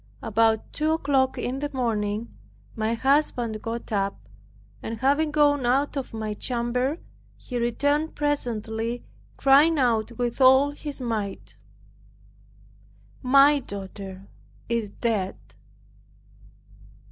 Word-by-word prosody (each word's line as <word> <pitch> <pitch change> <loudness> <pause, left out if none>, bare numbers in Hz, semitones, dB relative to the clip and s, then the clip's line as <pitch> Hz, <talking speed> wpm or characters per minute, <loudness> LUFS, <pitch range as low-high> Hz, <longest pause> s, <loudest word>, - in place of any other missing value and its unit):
About 225 0 +1
two 310 +1 +1
o'clock 275 -4 +1
in 260 +2 -3
the 290 +1 -3
morning 220 -3 -2 0.4
my 220 0 0
husband 245 -4 +1
got 230 +1 -5
up, 195 - -2 0.5
and 225 0 -5
having 285 +6 +2
gone 290 -2 +3
out 270 +5 +1
of 275 -2 -4
my 220 -1 -4
chamber, 250 +5 -1 0.4
he 245 -2 -5
returned 285 +6 0
presently, 235 -5 -2 0.3
crying 290 +4 +5
out 235 -4 +1
with 240 +2 -3
all 265 +2 +6
his 290 -1 -7
might, 215 -5 -4 1.7
"My 275 +3 +5
daughter 195 -3 -8 0.4
is 230 -3 -1
dead!" 200 -3 -2
240 Hz, 105 wpm, -25 LUFS, 220-280 Hz, 1.7 s, all